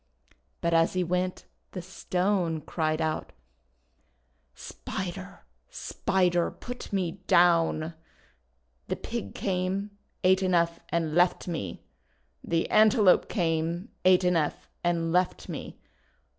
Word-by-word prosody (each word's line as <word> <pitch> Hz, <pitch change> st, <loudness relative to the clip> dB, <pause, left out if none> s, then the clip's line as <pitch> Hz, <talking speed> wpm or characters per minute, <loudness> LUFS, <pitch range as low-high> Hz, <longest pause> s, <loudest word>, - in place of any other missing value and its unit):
But 170 Hz, -1 st, +1 dB
as 165 Hz, 0 st, +4 dB
he 185 Hz, -1 st, +1 dB
went 180 Hz, +1 st, -2 dB, 0.3 s
the 185 Hz, -, -4 dB
Stone 180 Hz, -2 st, -1 dB
cried 155 Hz, 0 st, -1 dB
out: 155 Hz, -1 st, -2 dB, 0.7 s
— 60 Hz, 0 st, -43 dB, 0.2 s
"Spider! -, -, -6 dB, 0.3 s
Spider! 180 Hz, -3 st, 0 dB
Put 245 Hz, 0 st, -8 dB
me 190 Hz, -2 st, -2 dB
down! 165 Hz, -2 st, +3 dB, 0.9 s
The -, -, -1 dB
Pig 95 Hz, -, -5 dB
came, 190 Hz, +2 st, -1 dB, 0.3 s
ate 190 Hz, +1 st, +4 dB
enough, 170 Hz, -3 st, +2 dB
and 165 Hz, -2 st, -1 dB
left 175 Hz, +2 st, +2 dB
me! 155 Hz, -, -4 dB, 0.6 s
The 165 Hz, -1 st, 0 dB
Antelope 215 Hz, -2 st, +5 dB
came, 170 Hz, +1 st, -1 dB
ate 185 Hz, 0 st, +5 dB
enough, 170 Hz, -4 st, 0 dB, 0.2 s
and 170 Hz, -1 st, +1 dB
left 180 Hz, +1 st, +1 dB
me! -, -, -7 dB
175 Hz, 110 wpm, -28 LUFS, 165-185 Hz, 0.9 s, Antelope